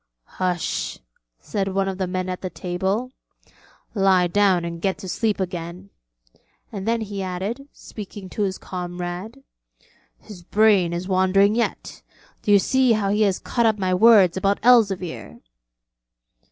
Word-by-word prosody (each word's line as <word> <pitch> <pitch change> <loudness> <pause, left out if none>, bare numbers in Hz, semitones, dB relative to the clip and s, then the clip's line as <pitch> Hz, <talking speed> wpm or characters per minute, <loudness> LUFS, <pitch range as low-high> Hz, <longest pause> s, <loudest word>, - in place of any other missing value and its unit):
'Hush,' 180 -2 -2 0.4
said 195 - -3
one 195 0 0
of 190 0 -4
the 190 - -1
men 185 0 -3
at 185 -1 -4
the 185 - -4
table, 190 +8 -2 0.8
'lie 195 -3 +3
down 185 -1 +2
and 170 0 -6
get 190 0 0
to 190 - -9
sleep 215 +3 -1
again'; 180 +1 -5 0.8
and 200 -1 -6
then 230 0 +1
he 205 -2 -5
added, 195 +9 -4
speaking 205 -2 -10
to 210 - -5
his 190 -2 -1
comrade: 180 +7 -6 0.7
'His 200 -5 -13
brain 200 -2 +3
is 175 +2 -4
wandering 195 +2 +3
yet: 235 +1 -3 0.4
do 210 - 0
you 205 - +8
see 255 +4 +3
how 200 -2 0
he 210 +1 +1
has 200 -3 +2
caught 235 -2 0
up 220 -1 +1
my 185 -2 0
words 195 -2 +6
about 195 +1 +1
Elzevir?' 200 -8 +2
195 Hz, 150 wpm, -22 LUFS, 180-210 Hz, 0.8 s, you